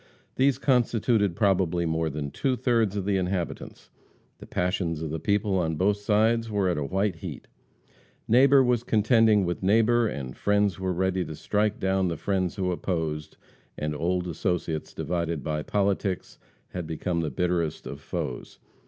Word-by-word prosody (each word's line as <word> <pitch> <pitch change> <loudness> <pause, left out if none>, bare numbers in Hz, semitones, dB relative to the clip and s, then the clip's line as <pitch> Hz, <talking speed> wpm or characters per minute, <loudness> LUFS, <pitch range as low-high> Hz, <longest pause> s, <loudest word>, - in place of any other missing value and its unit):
These 135 0 +3
constituted 115 -6 +2
probably 90 -4 +2
more 80 0 0
than 70 -1 -4
two 130 - 0
thirds 115 -5 +1
of 100 -2 -2
the 100 -1 +1
inhabitants. 90 -2 -4 0.5
The - - -11
passions 90 -3 -1
of 80 - -4
the 80 - -3
people 100 +1 +1
on 80 -2 0
both 100 +6 +2
sides 110 +2 +2
were 100 -3 +1
at 90 - 0
a - - -1
white 95 +4 -1
heat. - - -8 0.8
Neighbor 135 +3 +6
was 125 -2 +2
contending 110 -2 +4
with 85 0 -3
neighbor, 115 +4 +3
and 65 - -5
friends 105 -3 +1
were 95 -1 -1
ready 95 +1 0
to 80 - -7
strike 105 +5 0
down 95 0 +1
the 85 -2 -2
friends 95 -2 -1
who 90 -2 -1
opposed, 80 -4 -3 0.4
and 75 0 -2
old 90 +4 -1
associates 80 -1 -2
divided 85 -3 -2
by 75 -1 -2
politics, 100 +1 -1 0.3
had 90 -3 -5
become 85 +2 -2
the 80 - -1
bitterest 85 +1 -1
of - - -7
foes. 60 - -5
95 Hz, 160 wpm, -26 LUFS, 85-105 Hz, 0.8 s, Neighbor